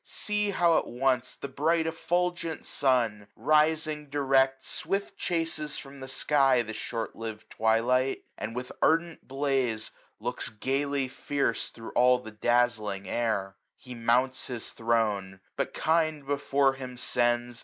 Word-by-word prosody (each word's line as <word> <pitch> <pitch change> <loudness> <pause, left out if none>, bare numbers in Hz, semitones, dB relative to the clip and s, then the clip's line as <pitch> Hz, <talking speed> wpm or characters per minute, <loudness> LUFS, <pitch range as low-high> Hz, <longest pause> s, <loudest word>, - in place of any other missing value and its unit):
See, 210 -1 0
how 175 -4 +4
at - - -7
once 125 0 0
the - - -6
bright 160 +5 +1
eflfulgent 175 0 -1
sun, 115 -7 +1
635 - - -41
Risiqg 155 0 +2
direct 135 -2 +2
swift 195 +4 -3
chases 165 -5 -1
from 140 0 -9
the 130 - -7
sky 135 -2 +3
The 110 -1 -6
short 115 0 -4
liv'd 110 -1 -7
twilight 120 +4 +2
j - - -28
and 115 - -5
with 125 0 -4
ardent 165 +1 +1
blaze 130 -5 0 0.3
Looks - - -2
gayly 135 +4 -1
fierce 135 -2 -1
thro* 115 - -10
all 125 0 +5
the 125 -3 -9
dazzling 110 -3 +1
air., 100 -4 -1 0.2
He 125 - -10
mounts 125 +3 +1
his 120 -3 -4
throne; 105 -5 0 0.2
but - - -2
kind 155 -2 +1
before 140 -1 +2
him 130 -2 -8
sends. 120 -1 0
130 Hz, 145 wpm, -28 LUFS, 115-150 Hz, 0.3 s, all